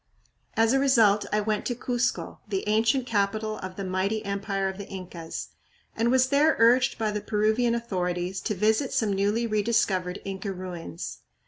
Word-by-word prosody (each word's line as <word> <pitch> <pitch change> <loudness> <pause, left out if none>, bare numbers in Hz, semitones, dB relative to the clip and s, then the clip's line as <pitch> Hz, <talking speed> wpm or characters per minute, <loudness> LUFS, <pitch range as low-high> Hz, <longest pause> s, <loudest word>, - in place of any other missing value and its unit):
As 225 +2 +4
a 270 - +4
result 225 -7 +4
I 210 - +2
went 210 0 -1
to 245 - -1
Cuzco, 245 0 -2
the 200 -1 -3
ancient 225 +5 +2
capital 215 -1 -1
of 185 0 -7
the 195 - -5
mighty 195 +4 -1
empire 195 -1 -1
of 190 +1 -5
the 200 - -7
Incas, 180 -4 -7 0.5
and 230 +1 +1
was 260 +1 +3
there 295 +3 +4
urged 240 +3 +4
by 220 -2 0
the 210 0 -3
Peruvian 220 +3 +1
authorities 180 -4 -2
to 210 - -2
visit 220 +7 +1
some 215 -3 +1
newly 205 +4 +1
re 215 -2 +1
discovered 195 -5 0
Inca 195 0 -4
ruins. 170 - -7
210 Hz, 175 wpm, -26 LUFS, 195-230 Hz, 0.5 s, As